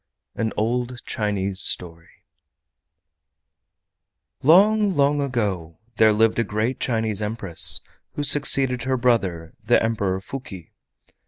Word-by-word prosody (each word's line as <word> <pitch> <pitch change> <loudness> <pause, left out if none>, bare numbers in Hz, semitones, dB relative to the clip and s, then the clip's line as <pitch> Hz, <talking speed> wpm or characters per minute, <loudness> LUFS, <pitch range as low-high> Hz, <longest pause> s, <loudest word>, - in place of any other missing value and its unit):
AN 110 -1 -2
OLD 120 +3 -2
CHINESE 100 -3 -3
STORY 85 -3 -4 2.2
Long, 200 +6 +4
long 145 +1 +2
ago 100 - -3 0.2
there 110 -1 +5
lived 110 +2 +2
a - - +2
great 110 +4 -3
Chinese 110 -4 -2
Empress 105 -5 +2 0.3
who 145 - -4
succeeded 135 -3 +3
her 130 0 0
brother 95 -10 -1
the - - +3
Emperor 100 -4 -1
Fuki. 95 -5 -9
115 Hz, 105 wpm, -22 LUFS, 100-130 Hz, 2.2 s, there